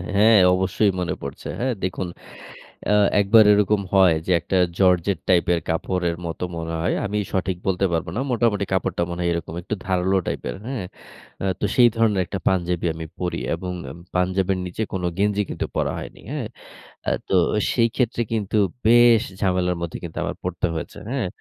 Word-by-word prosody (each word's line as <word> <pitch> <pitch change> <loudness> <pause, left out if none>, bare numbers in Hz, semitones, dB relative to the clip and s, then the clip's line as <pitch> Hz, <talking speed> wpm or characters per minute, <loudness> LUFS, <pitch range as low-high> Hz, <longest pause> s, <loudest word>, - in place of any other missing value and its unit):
হ্যা, 105 - +4 0.3
অবশ্যই 95 +2 +2
মনে 90 - -1
পড়ছে। 70 -1 -7
হ্যা? 125 - 0 0.2
দেখুন 95 0 -2 0.8
অ্যা 105 - +3 0.2
একবার 105 +2 +6
এরকম 105 0 +3
হয় 95 -4 +6
যে, - - -1
একটা 95 - -1 0.2
জর্জেট 90 -1 +3
টাইপের 85 -1 +3
কাপড়ের 85 +1 -1
মতো 85 +1 -4
মনে 80 0 -4
হয়, 85 - +1
আমি 105 +1 -2 0.2
সঠিক 95 -1 -1
বলতে 95 0 +1
পারব 85 -1 0
না। - - -1
মোটামুটি 115 -4 +1
কাপড়টা 95 -2 0
মনে 85 0 -5
হয় 85 - +1
এরকম 85 -1 -4
একটু 90 - -5
ধারালো 95 +1 +1
টাইপের, - - -3
হ্যা? 135 +2 -4 0.7
আ - - 0
তো - - 0
সেই 120 -1 +7
ধরনের 110 -4 +2
একটা 95 +3 -4
পাঞ্জাবি 90 -2 +1
আমি 80 0 -6
পড়ি। 90 -1 -2
এবং 90 -1 -4 0.2
এম 85 - -11 0.2
পাঞ্জাবের 95 +1 +1
নিচে 90 +5 -3
কোনো 90 -2 -1
গেঞ্জি 105 +1 +2
কিন্তু - - -3
পরা - - 0
হয়নি। - - -9
হ্যা? - - -3 0.7
আ - - +4 0.2
তো - - -1 0.4
সেই 115 -2 +3
ক্ষেত্রে 120 -2 0
কিন্তু 110 -1 -1 0.3
বেশ 120 0 +6 0.2
ঝামেলার 90 -2 +1
মধ্যে 85 -2 -4 0.5
পড়তে 90 0 -1
হয়েছে। 80 - -6
হ্যা? 125 -6 -1
95 Hz, 170 wpm, -23 LUFS, 90-105 Hz, 0.8 s, সেই